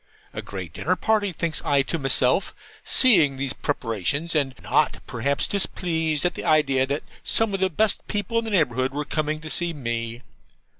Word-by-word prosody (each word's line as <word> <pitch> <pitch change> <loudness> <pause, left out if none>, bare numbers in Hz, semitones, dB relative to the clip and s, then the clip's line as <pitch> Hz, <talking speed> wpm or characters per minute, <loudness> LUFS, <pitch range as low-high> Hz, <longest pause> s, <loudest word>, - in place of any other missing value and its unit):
'A - - -5
great 90 -5 -8
dinner 175 - 0
party,' 205 +2 +1
thinks 165 -1 -2
I 140 -1 +2
to 165 +4 -3
myself, 135 +4 +1 0.3
seeing 155 - +4
these 135 -1 -2
preparations 140 - -2
(and 140 -4 0
not, - - +1
perhaps, 140 +4 -1
displeased 165 -5 0
at 175 - +1
the - - -7
idea 135 -4 +2
that 140 +2 -2 0.2
some 225 -2 +3
of 195 - -1
the 190 0 +2
best 205 +5 0
people 210 +2 -1
in 230 - -5
the - - -3
neighbourhood 130 - +1
were 150 0 -2
coming 155 0 -2
to 155 - -7
see 175 -1 +1
me). 120 -3 -4
150 Hz, 180 wpm, -24 LUFS, 130-180 Hz, 0.3 s, seeing